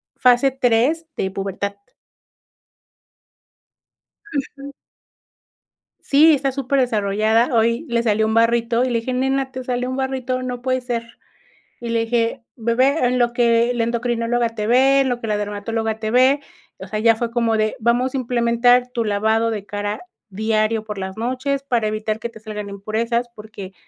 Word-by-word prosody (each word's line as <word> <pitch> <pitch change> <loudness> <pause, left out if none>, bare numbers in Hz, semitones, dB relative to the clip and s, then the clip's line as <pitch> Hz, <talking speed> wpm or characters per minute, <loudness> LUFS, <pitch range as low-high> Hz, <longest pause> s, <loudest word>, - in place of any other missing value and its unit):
fase 250 +2 +4
3 260 +5 +1
de 190 - -1
pubertad. 195 +1 -4 2.6
Ujú. 280 0 -5 1.3
Sí, 305 +3 +5
está 275 -1 0
superdesarrollada, 230 -4 +1
hoy 230 +6 +2
le 235 0 +1
salió 220 -1 +2
un 220 - 0
barrito 230 +1 +2
y 255 - 0
le 235 -2 +1
dije: 255 +3 -4
"Nena, 265 +1 0
te 260 -1 -6
salió 250 0 -2
un 260 - -3
barrito, 260 -1 -2
no 250 -1 -5
puede 255 0 0
ser". 235 -2 -5 0.6
Y 235 - -6
le 230 0 +1
dije: 235 +2 -1
"Bebé, 255 +5 +2
en 250 - 0
lo 240 -1 +2
que 235 0 +3
la 235 -1 0
endocrinóloga 235 0 0
te 215 -2 -4
ve, 265 +3 +4
en 265 - 0
lo 245 - -1
que 225 - -6
la 210 -1 0
dermatóloga 220 +2 -3
te 215 0 -3
ve, 260 +3 +4 0.4
o 190 - -9
sea, 215 +2 -3
ya 230 0 +4
fue 230 +1 -3
como 230 -2 +1
de 215 0 0
vamos 240 +3 +1
a - - -1
implementar 245 0 +2
tu 235 - 0
lavado 220 +2 +1
de 210 -3 -4
cara, 205 +1 -4 0.3
diario 215 +2 0
por 210 -2 -7
las 190 +1 -5
noches, 260 +4 -2
para 240 -5 0
evitar 215 0 -2
que 235 - -4
te 225 - -14
salgan 210 -1 -6
impurezas, 225 +4 -2
porque, 210 -3 -10
235 Hz, 165 wpm, -20 LUFS, 220-255 Hz, 2.6 s, Sí